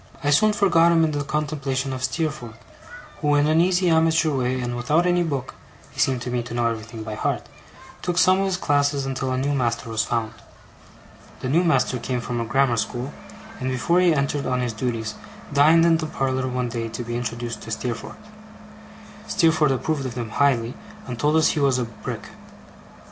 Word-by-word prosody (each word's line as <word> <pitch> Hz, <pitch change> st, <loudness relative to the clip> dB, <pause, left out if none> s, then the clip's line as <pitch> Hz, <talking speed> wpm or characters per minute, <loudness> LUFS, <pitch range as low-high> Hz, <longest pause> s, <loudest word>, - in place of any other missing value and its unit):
I 145 Hz, -, +2 dB
soon 215 Hz, +9 st, +5 dB
forgot 175 Hz, -5 st, +4 dB
him 165 Hz, -1 st, +4 dB
in 160 Hz, -, +2 dB
the 145 Hz, -1 st, -2 dB
contemplation 140 Hz, -3 st, -2 dB
of 130 Hz, 0 st, -5 dB
Steerforth, 130 Hz, -5 st, -3 dB, 0.6 s
who, 145 Hz, 0 st, +2 dB
in 145 Hz, 0 st, +3 dB
an 155 Hz, +2 st, +4 dB
easy 180 Hz, +1 st, +2 dB
amateur 160 Hz, -1 st, +3 dB
way, 130 Hz, 0 st, 0 dB
and 120 Hz, -1 st, -3 dB
without 150 Hz, +8 st, +1 dB
any 175 Hz, 0 st, +3 dB
book 140 Hz, -6 st, -3 dB, 0.4 s
(he -, -, -12 dB
seemed 130 Hz, -2 st, +1 dB
to 125 Hz, -, -4 dB
me 120 Hz, -1 st, 0 dB
to 120 Hz, 0 st, -7 dB
know 120 Hz, -1 st, +1 dB
everything 115 Hz, -1 st, -3 dB
by 110 Hz, 0 st, -5 dB
heart), -, -, -1 dB, 0.6 s
took 175 Hz, -1 st, -2 dB
some 185 Hz, +1 st, +5 dB
of 195 Hz, -, +1 dB
his 190 Hz, -2 st, 0 dB
classes 145 Hz, -3 st, +1 dB
until 130 Hz, -1 st, -2 dB
a 130 Hz, -, 0 dB
new 140 Hz, +2 st, 0 dB
master 120 Hz, -3 st, -1 dB
was 110 Hz, 0 st, +1 dB
found. 115 Hz, -2 st, -2 dB, 1.1 s
The 130 Hz, -, -3 dB
new 165 Hz, +6 st, +3 dB
master 155 Hz, -6 st, +2 dB
came 125 Hz, +1 st, -2 dB
from 120 Hz, 0 st, -3 dB
a -, -, -2 dB
grammar 125 Hz, +1 st, +2 dB
school; 120 Hz, +5 st, -3 dB, 0.5 s
and 130 Hz, -1 st, -2 dB
before 150 Hz, +8 st, +1 dB
he 180 Hz, -1 st, +4 dB
entered 140 Hz, -1 st, 0 dB
on 125 Hz, 0 st, 0 dB
his 120 Hz, -2 st, -2 dB
duties, 115 Hz, -2 st, -3 dB, 0.4 s
dined 155 Hz, +4 st, +6 dB
in 165 Hz, -1 st, +4 dB
the 160 Hz, -1 st, -3 dB
parlour 130 Hz, -3 st, -1 dB
one 125 Hz, -1 st, -2 dB
day, 115 Hz, -1 st, -3 dB
to 115 Hz, +2 st, -5 dB
be 120 Hz, 0 st, -5 dB
introduced 120 Hz, -1 st, -4 dB
to 115 Hz, -, -9 dB
Steerforth. 115 Hz, +1 st, -4 dB, 1.1 s
Steerforth 160 Hz, -3 st, +3 dB
approved 135 Hz, +1 st, -1 dB
of 120 Hz, -, -7 dB
him 115 Hz, -3 st, -4 dB
highly, 125 Hz, -2 st, +2 dB, 0.3 s
and 125 Hz, -2 st, -6 dB
told 150 Hz, +4 st, +2 dB
us 160 Hz, 0 st, +4 dB
he 155 Hz, -, -1 dB
was 135 Hz, -3 st, +3 dB
a 125 Hz, -, 0 dB
Brick. 115 Hz, -1 st, -7 dB
135 Hz, 200 wpm, -23 LUFS, 120-155 Hz, 1.1 s, dined